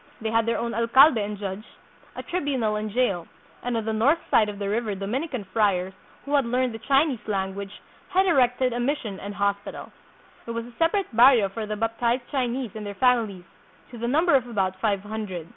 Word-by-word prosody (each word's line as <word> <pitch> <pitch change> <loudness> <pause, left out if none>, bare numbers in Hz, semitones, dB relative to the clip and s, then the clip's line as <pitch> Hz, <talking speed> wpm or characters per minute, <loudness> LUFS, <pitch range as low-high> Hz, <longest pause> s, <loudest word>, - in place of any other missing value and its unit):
They 220 0 -2
had 225 0 +2
their 230 - +1
own 235 0 -3
alcalde 235 +2 +5
and 205 0 -5
judge, 195 +1 -5 0.5
a - - -6
tribunal 270 -11 -1
and 215 0 -3
jail; 200 -7 0 0.3
and 245 -1 -2
on 225 - -3
the 220 - -1
north 250 +9 +3
side 215 -2 +4
of 205 - -7
the 200 -1 -3
river 215 0 -1
Dominican 245 - -3
friars, 190 -4 +1 0.3
who 285 - -4
had 280 -1 +4
learned 250 0 0
the 225 - -7
Chinese 275 +1 +2
lan 190 -2 -1
guage, 200 +1 -8 0.3
had 380 +1 +3
erected 255 -6 +2
a 240 - -2
mission 240 -6 -2
and 200 0 -7
hospital. 200 +1 -3 0.5
There 230 - -5
was 230 0 -3
a 240 - -13
separate 330 - +1
barrio 235 -4 +6
for 215 +2 -5
the 210 - -3
baptized 230 +3 0
Chinese 255 -3 -1
and 215 - -7
their 205 -1 -6
families, 225 -7 +1 0.5
to 240 - -9
the 235 - -2
number 320 +7 +3
of 260 -3 +3
about 190 -5 -1
five 200 -3 +1
hundred. 205 -5 -6
230 Hz, 205 wpm, -25 LUFS, 205-255 Hz, 0.5 s, barrio